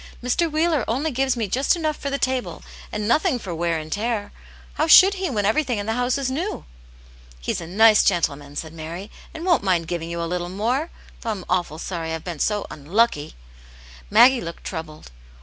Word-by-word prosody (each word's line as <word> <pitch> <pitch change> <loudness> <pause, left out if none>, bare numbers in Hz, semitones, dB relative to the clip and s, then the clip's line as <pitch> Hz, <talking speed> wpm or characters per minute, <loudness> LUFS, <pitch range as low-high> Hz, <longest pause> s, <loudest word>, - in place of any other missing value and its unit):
" - - -22
Mr. 310 +7 +1
Wheeler 310 -3 +1
only 280 +7 -1
gives 265 0 0
me 225 -3 -1
just 265 - +2
enough 310 -3 -1
for 280 - -4
the 280 - -1
table, 260 -2 -2 0.3
and 210 0 -3
nothing 250 +2 +2
for 190 -7 -6
wear 170 0 0
and 155 0 -7
tear; 210 -1 -2 0.4
how 310 - 0
should 385 +4 +8
he, 380 -2 -2
when 210 -6 -1
everything 245 +2 +1
in 205 - -3
the 225 - -1
house 245 +2 0
is 270 -2 -2
new? 340 +10 -3 0.4
" 60 - -24 0.3
"He's - - -3
a 165 - -7
nice 215 +4 +5
gentleman," 145 -6 0
said 160 +1 -5
Mary, 165 +6 -7 0.2
"and 330 +1 -7
won't 350 -7 +3
mind 180 -4 +1
giving 170 -1 -4
you 170 0 -4
a 170 - -1
little 175 +1 -3
more. 240 - -1 0.3
Though 230 - -4
I'm 200 -5 -4
awful 175 -4 -1
sorry 165 -1 -4
I've 160 - -8
been 170 -4 -6
so 210 +4 0
unlucky." 155 +1 0 0.7
Maggie 255 -1 +6
looked 170 0 -7
troubled. 155 - -7
210 Hz, 205 wpm, -23 LUFS, 170-265 Hz, 0.7 s, should